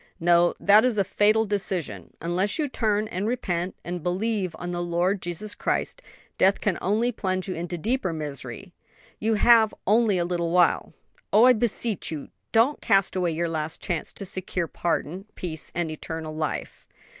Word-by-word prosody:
"No; 175 0 +4
that 210 +2 +6
is 250 -4 +1
a 200 - +4
fatal 215 +3 +3
delusion, 195 -5 -3
and 170 - -4
unless 190 +4 0
you 305 -2 0
turn 215 -5 0
and 190 +4 -2
repent, 185 -7 -2
and 175 0 -4
believe 185 +1 -1
on 175 0 -5
the 175 0 -2
Lord 175 +3 0
Jesus 175 +4 -5
Christ, - - -2 0.4
death 195 +1 +4
can 195 -4 -1
only 220 +6 +1
plunge 185 -4 -2
you 185 - -2
into 175 +1 -4
deeper 220 +1 -1
misery. 150 +2 -7 0.5
You 220 +1 +1
have 225 0 +5
only 215 -1 +3
a 175 - +1
little 170 -1 -1
while! 175 0 +3 0.4
Oh, 215 - +6
I 255 - +8
beseech 225 -2 -1
you, 150 -3 -6 0.2
don't 235 +6 +3
cast 195 -1 +2
away 180 -3 0
your 170 +2 -1
last 160 -1 -3
chance 170 -3 -3
to 200 - -7
secure 185 -2 -2
pardon, 175 +3 -2
peace 160 -3 -5
and 170 -2 -1
eternal 155 0 -6
life!" 155 -1 -4
185 Hz, 175 wpm, -25 LUFS, 170-215 Hz, 0.5 s, I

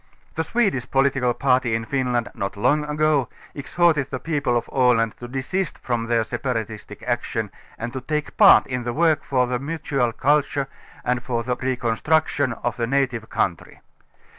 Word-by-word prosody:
The 160 - -1
Swedish 185 - 0
political 135 -2 +2
party 125 -3 +2
in 115 0 -2
Finland, 125 -2 -1
not 100 +1 -4
long 150 +8 +2
ago, 150 -3 +1 0.2
exhorted 150 -1 +1
the 130 - -4
people 145 -6 0
of 120 - -3
Aland 120 -4 +3
to 120 - -7
desist 140 +8 -3
from 120 -2 -2
their 115 -1 +2
separatistic 110 -4 -4
action 115 -3 -2 0.3
and 120 +1 -5
to 130 - -4
take 150 +2 -3
part - - +7
in 125 -1 -3
the 120 0 -3
work 160 +1 +2
for 125 -2 +1
the 125 0 -2
mutual 140 -4 -1
culture 140 +2 +1 0.4
and 125 -1 0
for 120 -2 -2
the 125 +1 -1
reconstruction 130 +2 0
of 120 -1 -1
the 115 -1 -1
native 125 -4 0
country. 85 -4 -2
125 Hz, 165 wpm, -23 LUFS, 120-140 Hz, 0.4 s, part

